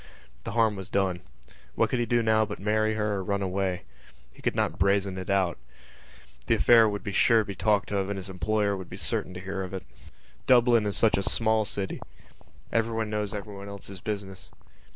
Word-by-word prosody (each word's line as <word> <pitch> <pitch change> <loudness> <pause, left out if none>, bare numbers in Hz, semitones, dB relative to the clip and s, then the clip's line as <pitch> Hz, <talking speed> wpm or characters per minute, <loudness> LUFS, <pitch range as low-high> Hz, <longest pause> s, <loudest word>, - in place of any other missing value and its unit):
The - - -4
harm 115 -2 +3
was 95 -2 -7
done. 95 -3 0 0.6
What - - +1
could 130 - +1
he 120 - 0
do 120 0 +2
now 110 0 +3
but 105 -1 -5
marry 110 +1 +1
her 105 -1 0
or 95 - -3
run 100 +1 -1
away? 95 -1 -1 0.5
He - - -16
could - - -1
not 85 - -1
brazen 100 0 +2
it 95 - -7
out. 95 -7 +1 0.9
The - - +4
affair 115 -2 +6
would 100 -1 -4
be 100 - -4
sure 115 +3 +4
to - - -5
be 100 - -5
talked 105 +2 +1
of 100 -1 0
and 100 - -3
his 95 0 -6
employer 100 +3 0
would 95 -2 -8
be - - -8
certain 90 - -3
to - - -5
hear 95 +1 -4
of 95 0 -5
it. 95 - -5 0.6
Dublin 120 -3 +5
is 100 - +1
such 110 - +4
a - - 0
small 110 +2 +2
city: 100 -2 -4 0.7
everyone 115 -1 0
knows 105 -1 -2
everyone 100 -1 -7
else's 100 -1 -8
business. 100 -3 -5
100 Hz, 205 wpm, -27 LUFS, 95-110 Hz, 0.9 s, affair